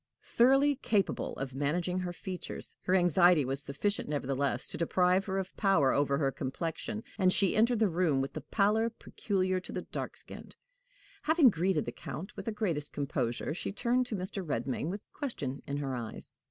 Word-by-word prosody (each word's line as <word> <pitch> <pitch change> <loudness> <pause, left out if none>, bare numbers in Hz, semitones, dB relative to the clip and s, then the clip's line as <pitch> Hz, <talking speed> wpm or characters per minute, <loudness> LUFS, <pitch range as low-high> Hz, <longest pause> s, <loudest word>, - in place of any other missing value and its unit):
Thoroughly 270 +3 +4
capable 205 -6 0
of 135 -1 -5
managing 170 +6 0
her 180 -1 -3
features, 180 +1 -6
her 185 - +3
anxiety 175 -3 +5
was 135 +2 0
sufficient 145 +7 -2
nevertheless 140 -2 0
to - - -3
deprive 180 +3 +2
her 190 -1 -2
of 190 -1 -4
power 195 -10 +4
over 140 -1 +2
her 140 -2 +1
complexion, 165 - -4 0.2
and 185 -1 +5
she 195 -1 +3
entered 235 +2 +4
the 220 -1 +3
room 165 -5 +1
with 135 +1 -2
the - - -5
pallor 220 +2 +2
peculiar 185 -4 -1
to - - -9
the - - -4
dark - - -5
skinned. - - -11 0.7
Having 310 -5 +5
greeted 175 -2 +1
the - - -3
Count 190 +6 -7
with 195 - -7
the 225 - -1
greatest 170 -9 -2
composure, 130 -2 -2
she 175 - -4
turned 245 +4 +1
to 225 - -2
Mr. 190 +1 -4
Redmain 135 0 -2
with 200 +3 -4
question 145 - -4
in 140 - -2
her 140 -2 -2
eyes. 115 -3 -6
180 Hz, 180 wpm, -31 LUFS, 140-205 Hz, 0.7 s, anxiety